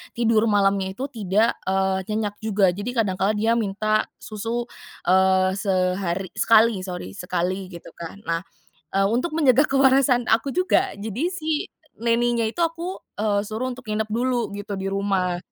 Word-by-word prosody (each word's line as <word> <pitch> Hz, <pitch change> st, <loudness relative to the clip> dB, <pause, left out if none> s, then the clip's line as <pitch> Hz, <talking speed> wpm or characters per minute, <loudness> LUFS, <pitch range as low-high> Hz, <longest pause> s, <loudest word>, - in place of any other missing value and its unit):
tidur 230 Hz, -2 st, +3 dB
malamnya 195 Hz, -2 st, +2 dB
itu, 260 Hz, -, -4 dB
tidak, 215 Hz, 0 st, +1 dB
eee, 190 Hz, 0 st, 0 dB
nyenyak 210 Hz, -1 st, -2 dB
juga. 200 Hz, -3 st, +3 dB
Jadi, 205 Hz, +6 st, -5 dB
kadang 205 Hz, -6 st, 0 dB
kala 195 Hz, +3 st, +2 dB
dia 225 Hz, +2 st, +2 dB
minta 215 Hz, 0 st, 0 dB, 0.2 s
susu, 230 Hz, +3 st, -3 dB, 0.4 s
eee, 190 Hz, 0 st, +4 dB
sehari 185 Hz, -1 st, 0 dB
sekali 225 Hz, 0 st, +5 dB
sorry 180 Hz, -, -6 dB
sekali, 180 Hz, +1 st, -2 dB
gitu 170 Hz, -, -10 dB
kan. 170 Hz, +3 st, -8 dB
Nah, 165 Hz, 0 st, -1 dB, 0.5 s
eee, 195 Hz, 0 st, +3 dB
untuk 250 Hz, +8 st, 0 dB
menjaga 285 Hz, -2 st, +4 dB
kewarasan, 265 Hz, -2 st, +3 dB
aku 225 Hz, +5 st, +2 dB
juga. 370 Hz, +1 st, +2 dB
Jadi, 220 Hz, +6 st, -4 dB
si 320 Hz, -3 st, -3 dB, 0.5 s
nanny-nya 235 Hz, 0 st, +2 dB
itu 285 Hz, -, -5 dB
aku, 335 Hz, +3 st, -2 dB, 0.2 s
eee, 205 Hz, -1 st, +1 dB
suruh 220 Hz, +4 st, -3 dB
untuk 250 Hz, 0 st, -10 dB
nginep 215 Hz, 0 st, -1 dB
dulu 240 Hz, +1 st, 0 dB
gitu, 205 Hz, 0 st, -6 dB
di 195 Hz, -, -3 dB
rumah. 195 Hz, -3 st, 0 dB
215 Hz, 155 wpm, -23 LUFS, 190-240 Hz, 0.5 s, sekali